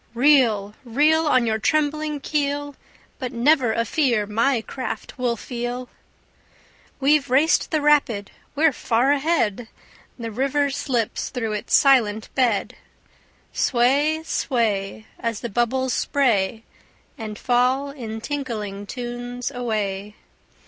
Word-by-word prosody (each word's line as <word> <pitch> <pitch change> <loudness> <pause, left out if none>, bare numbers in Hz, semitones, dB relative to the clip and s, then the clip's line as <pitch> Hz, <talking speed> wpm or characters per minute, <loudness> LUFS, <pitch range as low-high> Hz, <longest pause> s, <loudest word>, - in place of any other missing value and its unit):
Reel, 235 -7 +3
reel. 305 +6 +2
On 255 -4 +3
your 220 -1 0
trembling 305 +2 0
keel, 285 -1 -2 0.4
But 255 -3 -4
never 250 0 +3
a 230 +1 0
fear 235 -5 +1
my 230 +4 +1
craft 260 +1 -6
will 240 -2 0
feel. 245 +1 -5 1.1
We've 280 0 +3
raced 280 +6 +3
the 310 - 0
rapid, 280 -9 +2 0.2
we're 305 0 +3
far 245 +3 +1
ahead! 275 -7 0 0.5
The 230 -2 -5
river 275 +4 0
slips 245 -5 -2
through 230 -4 -3
its 210 - 0
silent 225 -6 +3
bed. 240 -6 +1 0.8
Sway, 285 +6 +2
sway, 220 -8 -1
As 230 -2 -3
the 235 - -4
bubbles 240 +4 0
spray 225 -6 +1 0.5
And 215 -2 -7
fall 255 +3 +1
in 225 -5 -7
tinkling 215 -8 -4
tunes 245 +1 -5
away. 210 -5 -3
245 Hz, 115 wpm, -23 LUFS, 225-280 Hz, 1.1 s, Reel